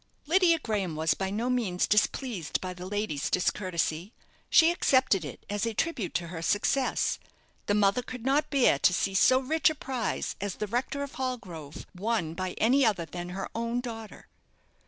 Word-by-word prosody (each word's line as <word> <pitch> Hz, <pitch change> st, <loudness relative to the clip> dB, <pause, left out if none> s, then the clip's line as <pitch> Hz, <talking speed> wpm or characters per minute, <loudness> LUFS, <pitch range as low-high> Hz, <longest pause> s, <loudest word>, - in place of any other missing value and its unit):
Lydia 340 Hz, +1 st, +4 dB
Graham 205 Hz, -, -2 dB
was 160 Hz, +1 st, +2 dB
by 190 Hz, -1 st, -3 dB
no 220 Hz, +5 st, -2 dB
means 230 Hz, -8 st, +1 dB
displeased 210 Hz, -, 0 dB
by 185 Hz, -1 st, -5 dB
the 180 Hz, 0 st, -8 dB
lady's 205 Hz, -7 st, -2 dB
discourtesy. 180 Hz, 0 st, -1 dB, 0.4 s
She 330 Hz, 0 st, +6 dB
accepted 260 Hz, -, +3 dB
it 145 Hz, -, -9 dB
as 205 Hz, -1 st, -2 dB
a 230 Hz, -1 st, -1 dB
tribute 240 Hz, -, -2 dB
to 170 Hz, -1 st, -1 dB
her 165 Hz, -2 st, -6 dB
success. 205 Hz, +9 st, +1 dB, 0.5 s
The 205 Hz, -, +2 dB
mother 205 Hz, +3 st, +3 dB
could 250 Hz, -1 st, -8 dB
not 290 Hz, +3 st, +2 dB
bear 260 Hz, -, +3 dB
to 180 Hz, -, +4 dB
see 195 Hz, +2 st, 0 dB
so 255 Hz, +6 st, +5 dB
rich 310 Hz, +4 st, +2 dB
a 315 Hz, -, -4 dB
prize 255 Hz, -5 st, -3 dB
as 200 Hz, -2 st, -3 dB
the 210 Hz, -, -3 dB
rector 250 Hz, +6 st, -2 dB
of 280 Hz, -, -6 dB
Hallgrove 185 Hz, -, -5 dB
won 195 Hz, -4 st, -1 dB
by 185 Hz, +1 st, -3 dB
any 260 Hz, +5 st, +4 dB
other 200 Hz, -8 st, +2 dB
than 175 Hz, +1 st, -7 dB
her 190 Hz, +2 st, -4 dB
own 235 Hz, +1 st, -1 dB
daughter. 225 Hz, -3 st, -8 dB
210 Hz, 180 wpm, -28 LUFS, 180-255 Hz, 0.5 s, She